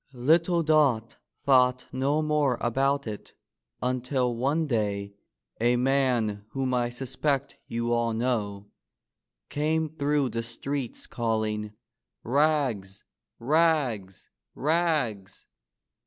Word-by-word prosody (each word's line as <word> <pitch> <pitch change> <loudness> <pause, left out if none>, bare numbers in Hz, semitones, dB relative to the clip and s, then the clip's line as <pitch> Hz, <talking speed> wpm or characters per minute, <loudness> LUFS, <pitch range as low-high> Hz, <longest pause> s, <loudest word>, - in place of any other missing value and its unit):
Little 165 +7 +3
Dot 140 -8 +2 0.3
thought 125 -2 +4
no 140 +4 +1
more 150 -5 +1
about 135 +4 +1
it 105 -2 -7 0.5
until 125 0 0
one 140 +7 +1
day 100 -6 -1 0.5
a 120 +2 +3
man 125 -5 +1
whom 130 -1 -1
I 120 -1 +1
suspect 135 +3 -2
you 115 +1 -1
all 120 0 +1
know 105 -4 -2 0.8
came 155 +2 0
through 145 -2 +1
the 115 - -2
streets 125 +3 -5
calling: 110 -2 -2 0.5
^^Rags! 130 -8 +1 0.3
rags! 130 - 0 0.2
rags! 150 - 0
125 Hz, 95 wpm, -27 LUFS, 115-145 Hz, 0.8 s, thought